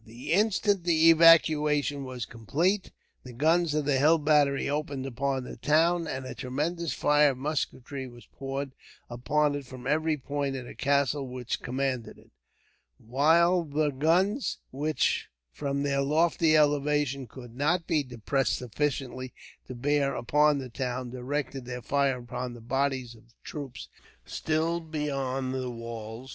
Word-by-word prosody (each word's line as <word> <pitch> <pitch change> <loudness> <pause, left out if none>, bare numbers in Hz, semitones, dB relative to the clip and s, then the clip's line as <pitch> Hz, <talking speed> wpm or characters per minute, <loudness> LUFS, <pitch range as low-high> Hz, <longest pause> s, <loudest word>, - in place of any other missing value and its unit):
The 115 +6 -8
instant 205 -1 +2
the 165 -1 +5
evacuation 150 -3 +5
was 125 -3 -5
complete, 165 - -1 0.3
the 125 - -11
guns 160 +4 +2
of 150 -1 0
the 140 -2 +2
hill 155 +4 +5
battery 150 -2 +2
opened 145 -2 -3
upon 135 +1 -2
the 125 - -9
town; 165 +5 +2
and 130 -3 -4
a - - -6
tremendous 150 +6 -3
fire 150 -1 +3
of - - -12
musketry 140 -1 -3
was 120 -1 -14
poured 135 0 -5 0.4
upon 145 +5 +1
it 145 -2 -5
from 130 -1 -10
every 155 +2 +1
point 140 0 -3
of 130 -2 -6
the - - -9
castle 140 0 +1
which 125 -1 -4
commanded 130 -2 -3
it; - - -21 0.7
while 165 +8 +3
the 150 -1 0
guns, 180 - +1
which 150 +3 0 0.2
from 140 - -2
their 140 -1 +1
lofty 155 +2 +3
elevation, 145 -2 +1
could 120 0 -12
not 165 +6 +1
be 155 - +1
depressed 125 -2 -1
sufficiently 130 +1 -3 0.3
to 130 - -7
bear 140 +2 +1
upon 150 +4 +3
the 130 -2 -5
town, 125 0 -4
directed 135 +1 -4
their 125 -1 -6
fire 140 0 +1
upon 125 0 -6
the - - -10
bodies 130 0 -1
of 115 0 -21
troops 135 -5 -7 0.4
still 160 +2 -1
beyond 135 -5 -3
the 130 -1 -3
walls. 115 +1 -7
140 Hz, 150 wpm, -28 LUFS, 130-150 Hz, 0.7 s, the